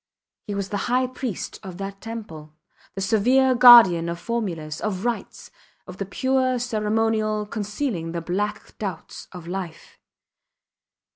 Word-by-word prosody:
He 205 Hz, -, -3 dB
was 200 Hz, -1 st, -3 dB
the 205 Hz, -, -2 dB
high 255 Hz, +1 st, +2 dB
priest 255 Hz, -5 st, -5 dB
of 190 Hz, -4 st, -9 dB
that 195 Hz, 0 st, -7 dB
temple, 165 Hz, -10 st, -8 dB, 0.4 s
the 195 Hz, -, -4 dB
severe 250 Hz, +6 st, +3 dB
guardian 235 Hz, -9 st, +8 dB
of 170 Hz, -, -3 dB
formulas, 170 Hz, -10 st, -4 dB
of 205 Hz, -1 st, -3 dB
rites, 240 Hz, -1 st, -4 dB, 0.3 s
of 185 Hz, 0 st, -10 dB
the 195 Hz, -, -4 dB
pure 260 Hz, +3 st, +1 dB
ceremonial 215 Hz, -2 st, 0 dB
concealing 205 Hz, -, -3 dB
the 170 Hz, -, -3 dB
black 205 Hz, +5 st, -3 dB
doubts 190 Hz, -6 st, -6 dB
of 180 Hz, -3 st, -10 dB
life. 175 Hz, -3 st, -7 dB
210 Hz, 135 wpm, -23 LUFS, 185-235 Hz, 0.4 s, guardian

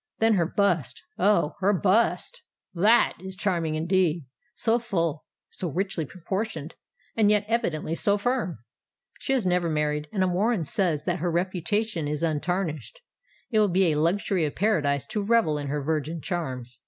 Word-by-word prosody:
Then 225 Hz, 0 st, +3 dB
her 175 Hz, -5 st, +2 dB
bust—oh! 175 Hz, -, 0 dB
her 200 Hz, +2 st, +3 dB
bust—that 210 Hz, -, +1 dB
is 190 Hz, +1 st, -8 dB
charming 175 Hz, -5 st, -1 dB
indeed,—so 175 Hz, -, 0 dB
full—so 170 Hz, -4 st, -4 dB
richly 185 Hz, -1 st, -2 dB
proportioned—and 190 Hz, +4 st, -3 dB
yet 210 Hz, 0 st, +3 dB
evidently 195 Hz, -9 st, -1 dB
so 200 Hz, +5 st, +2 dB
firm! 240 Hz, -, -1 dB, 0.6 s
She 270 Hz, -, -1 dB
has 250 Hz, -7 st, +1 dB
never 180 Hz, -1 st, +1 dB
been 160 Hz, -, -1 dB
married, 150 Hz, 0 st, -1 dB
and 185 Hz, -3 st, +1 dB
Warren 210 Hz, 0 st, +1 dB
says 165 Hz, -4 st, 0 dB
that 180 Hz, -1 st, -1 dB
her 175 Hz, -, -1 dB
reputation 180 Hz, +1 st, -1 dB
is 150 Hz, +1 st, -2 dB
untarnished. 170 Hz, -, -2 dB, 0.5 s
It 220 Hz, -, +3 dB
will 210 Hz, -1 st, +4 dB
be 180 Hz, -1 st, +3 dB
a 150 Hz, -, 0 dB
luxury 180 Hz, +2 st, +1 dB
of 150 Hz, -, -2 dB
paradise 150 Hz, -9 st, +1 dB
to 210 Hz, -, -3 dB
revel 200 Hz, -8 st, +2 dB
in 145 Hz, -, -4 dB
her 145 Hz, +1 st, -2 dB
virgin 155 Hz, +2 st, -2 dB
charms. 130 Hz, -, -5 dB
180 Hz, 145 wpm, -26 LUFS, 155-205 Hz, 0.6 s, will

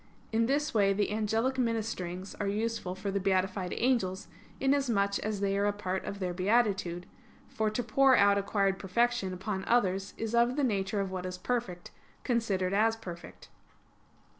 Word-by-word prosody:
In 225 Hz, +1 st, +2 dB
this 290 Hz, +3 st, 0 dB
way 200 Hz, -3 st, +3 dB
the 205 Hz, +1 st, 0 dB
angelic 220 Hz, +5 st, 0 dB
ministerings 210 Hz, -6 st, -2 dB
are 205 Hz, -, -1 dB
useful 210 Hz, -2 st, -2 dB
for 195 Hz, +1 st, -4 dB
the 200 Hz, -, 0 dB
beatified 190 Hz, -1 st, 0 dB
angels, 210 Hz, -7 st, 0 dB, 0.3 s
inasmuch 245 Hz, -8 st, +1 dB
as 210 Hz, -2 st, -3 dB
they 195 Hz, -1 st, +1 dB
are 205 Hz, -, +2 dB
a -, -, +3 dB
part 190 Hz, -2 st, -3 dB
of 200 Hz, -, -5 dB
their 185 Hz, -2 st, -2 dB
beatitude; 190 Hz, -3 st, +1 dB, 0.4 s
for 220 Hz, -1 st, -1 dB
to 215 Hz, +3 st, -2 dB
pour 260 Hz, +4 st, +4 dB
out 200 Hz, 0 st, +5 dB
acquired 195 Hz, -1 st, 0 dB
perfection 235 Hz, +1 st, 0 dB
upon 190 Hz, +1 st, -4 dB
others 195 Hz, -5 st, +1 dB
is 225 Hz, 0 st, -3 dB
of 235 Hz, +1 st, +3 dB
the 290 Hz, -, 0 dB
nature 200 Hz, -4 st, 0 dB
of 195 Hz, -1 st, -3 dB
what 185 Hz, -1 st, -4 dB
is 180 Hz, 0 st, -5 dB
perfect, 185 Hz, -4 st, -3 dB, 0.3 s
considered 200 Hz, -7 st, 0 dB
as 220 Hz, +2 st, +3 dB
perfect. 175 Hz, -6 st, -10 dB
200 Hz, 165 wpm, -30 LUFS, 190-230 Hz, 0.4 s, out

